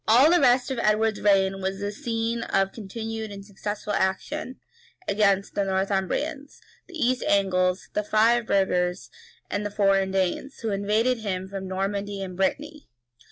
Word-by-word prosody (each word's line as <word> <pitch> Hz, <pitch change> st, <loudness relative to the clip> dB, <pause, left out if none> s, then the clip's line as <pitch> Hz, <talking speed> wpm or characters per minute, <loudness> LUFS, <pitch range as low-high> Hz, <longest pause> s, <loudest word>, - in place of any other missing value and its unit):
All 250 Hz, +8 st, +6 dB
the 350 Hz, -, +5 dB
rest 250 Hz, 0 st, +4 dB
of 260 Hz, -, -2 dB
Edward's 215 Hz, -1 st, +1 dB
reign 195 Hz, -1 st, +3 dB
was 190 Hz, +1 st, -2 dB
a 205 Hz, 0 st, -2 dB
scene 230 Hz, -1 st, -2 dB
of 195 Hz, -3 st, +1 dB
continued 220 Hz, +1 st, -6 dB
and 200 Hz, -1 st, -9 dB
successful 205 Hz, +1 st, -5 dB
action 255 Hz, +8 st, -2 dB, 0.5 s
against 200 Hz, -1 st, +2 dB
the 200 Hz, -, 0 dB
Northumbrians, 195 Hz, -, -2 dB, 0.3 s
the 360 Hz, -, -12 dB
East 255 Hz, -3 st, +1 dB
Angles, 185 Hz, -2 st, +2 dB
the 210 Hz, -, 0 dB
Five 225 Hz, +2 st, +3 dB
burgers, 180 Hz, -2 st, 0 dB, 0.4 s
and 205 Hz, -, -2 dB
the 205 Hz, -, -2 dB
foreign 195 Hz, -1 st, +2 dB
Danes, 190 Hz, +8 st, -1 dB
who 225 Hz, -2 st, -2 dB
invaded 215 Hz, +5 st, +1 dB
him 190 Hz, -3 st, -3 dB
from 190 Hz, -1 st, -6 dB
Normandy 195 Hz, +1 st, -3 dB
and 185 Hz, -1 st, -7 dB
Brittany. 295 Hz, -, -2 dB
205 Hz, 155 wpm, -25 LUFS, 195-230 Hz, 0.5 s, All